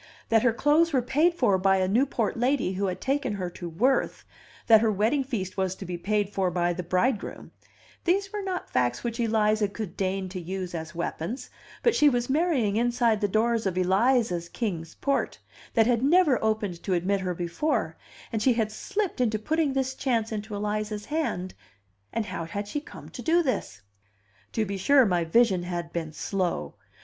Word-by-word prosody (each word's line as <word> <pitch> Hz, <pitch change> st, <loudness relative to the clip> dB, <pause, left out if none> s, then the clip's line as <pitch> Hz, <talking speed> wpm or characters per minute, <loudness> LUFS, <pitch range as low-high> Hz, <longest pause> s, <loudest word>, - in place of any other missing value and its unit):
That 225 Hz, -1 st, +4 dB
her 245 Hz, 0 st, +4 dB
clothes 300 Hz, +7 st, +3 dB
were 255 Hz, -3 st, +2 dB
paid 305 Hz, +8 st, +2 dB
for 210 Hz, -, +2 dB
by 190 Hz, +1 st, +3 dB
a 185 Hz, -1 st, +1 dB
Newport 235 Hz, +1 st, +1 dB
lady 245 Hz, -4 st, +1 dB
who 195 Hz, +1 st, -1 dB
had 180 Hz, -, -3 dB
taken 270 Hz, -4 st, -1 dB
her 185 Hz, -3 st, -4 dB
to 175 Hz, 0 st, -7 dB
Worth, 245 Hz, +12 st, +1 dB, 0.4 s
that 220 Hz, -2 st, +7 dB
her 225 Hz, -1 st, +3 dB
wedding 220 Hz, +8 st, +1 dB
feast 205 Hz, -9 st, -4 dB
was 190 Hz, -1 st, 0 dB
to 190 Hz, -, -8 dB
be 180 Hz, 0 st, -4 dB
paid 205 Hz, +3 st, -1 dB
for 190 Hz, -2 st, 0 dB
by 175 Hz, 0 st, 0 dB
the 175 Hz, -, -4 dB
bridegroom, 185 Hz, +7 st, -1 dB, 0.5 s
these 390 Hz, +3 st, +1 dB
were 415 Hz, -, -2 dB
not 375 Hz, -2 st, -3 dB
facts 125 Hz, -1 st, 0 dB
which 235 Hz, 0 st, -3 dB
Eliza 215 Hz, -2 st, +2 dB
would 215 Hz, -6 st, -5 dB
deign 190 Hz, 0 st, -1 dB
to 185 Hz, -1 st, -6 dB
use 185 Hz, +1 st, -5 dB
as 160 Hz, -1 st, -6 dB
weapons; 175 Hz, +9 st, -4 dB, 0.3 s
but 470 Hz, -, +4 dB
she 295 Hz, -, +5 dB
was 245 Hz, -1 st, -1 dB
marrying 275 Hz, -, +1 dB
inside 235 Hz, -2 st, +2 dB
the 205 Hz, -, +2 dB
doors 225 Hz, +1 st, +1 dB
of 185 Hz, -1 st, -2 dB
Eliza's 190 Hz, -1 st, +2 dB
Kings 175 Hz, -9 st, -4 dB
Port, 275 Hz, -1 st, -1 dB, 0.4 s
that 225 Hz, -2 st, +5 dB
had 235 Hz, -1 st, +2 dB
never 295 Hz, -3 st, +4 dB
opened 210 Hz, -5 st, -1 dB
to 190 Hz, -, 0 dB
admit 190 Hz, +3 st, +1 dB
her 180 Hz, -2 st, -2 dB
before, 175 Hz, -, -1 dB, 0.4 s
and 220 Hz, -, 0 dB
she 255 Hz, +2 st, +4 dB
had 220 Hz, -2 st, 0 dB
slipped 385 Hz, -, -2 dB
into 220 Hz, -3 st, +2 dB
putting 310 Hz, +5 st, 0 dB
this 265 Hz, -1 st, 0 dB
chance 235 Hz, -5 st, -1 dB
into 215 Hz, 0 st, -4 dB
Eliza's 210 Hz, 0 st, -3 dB
hand 295 Hz, -, -2 dB, 0.6 s
and 230 Hz, -1 st, -1 dB
how 185 Hz, -4 st, -4 dB
had 205 Hz, +4 st, -5 dB
she 290 Hz, +8 st, -3 dB
come -, -, -12 dB
to -, -, -8 dB
do 340 Hz, +1 st, +3 dB
this? 105 Hz, -, -3 dB, 0.7 s
To 220 Hz, -, 0 dB
be 200 Hz, 0 st, -4 dB
sure, 265 Hz, +7 st, +5 dB
my 175 Hz, -4 st, +1 dB
vision 195 Hz, +1 st, +3 dB
had 175 Hz, -1 st, -5 dB
been 165 Hz, -2 st, -3 dB
slow! 175 Hz, -, -2 dB
215 Hz, 190 wpm, -27 LUFS, 185-255 Hz, 0.7 s, that